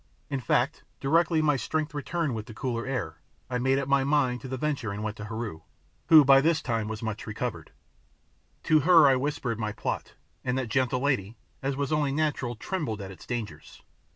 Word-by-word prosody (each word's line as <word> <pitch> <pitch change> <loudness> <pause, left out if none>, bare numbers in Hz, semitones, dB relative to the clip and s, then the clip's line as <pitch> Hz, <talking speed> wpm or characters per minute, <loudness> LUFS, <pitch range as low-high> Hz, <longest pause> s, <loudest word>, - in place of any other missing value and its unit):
In 140 - 0
fact, 125 - 0 0.2
directly 160 +3 +2
my 150 -2 +3
strength 155 +5 -2
returned 150 0 -2
with 110 -1 -5
the 110 - -10
cooler 120 -1 -3
air, 125 -6 -3 0.3
I 125 - 0
made 130 +2 +2
up 140 -1 -1
my 140 -1 +3
mind 135 -3 +1
to 135 - -7
the 130 0 -4
venture 140 -6 -2
and 100 +1 -5
went 110 -1 -3
to 105 - -6
Heru, 110 -7 -5 0.5
who 155 -3 +8
by 135 0 +7
this 160 +2 +2
time 115 -4 -2
was 110 +1 -5
much 110 0 -4
recovered. 110 - -4 0.9
To 155 - +4
her 165 0 +7
I 135 - +5
whispered 130 -4 -2
my 105 -1 -1
plot, - - -4 0.3
and 125 0 -1
that 130 -3 -2
gentle 130 +1 +1
lady, 120 -6 0 0.2
as 135 0 -1
was 140 0 -2
only 150 -2 +1
natural, 140 -5 -1
trembled 140 - -3
at 95 -1 -7
its 95 - -13
dangers. 120 -4 -6
130 Hz, 200 wpm, -27 LUFS, 115-145 Hz, 0.9 s, who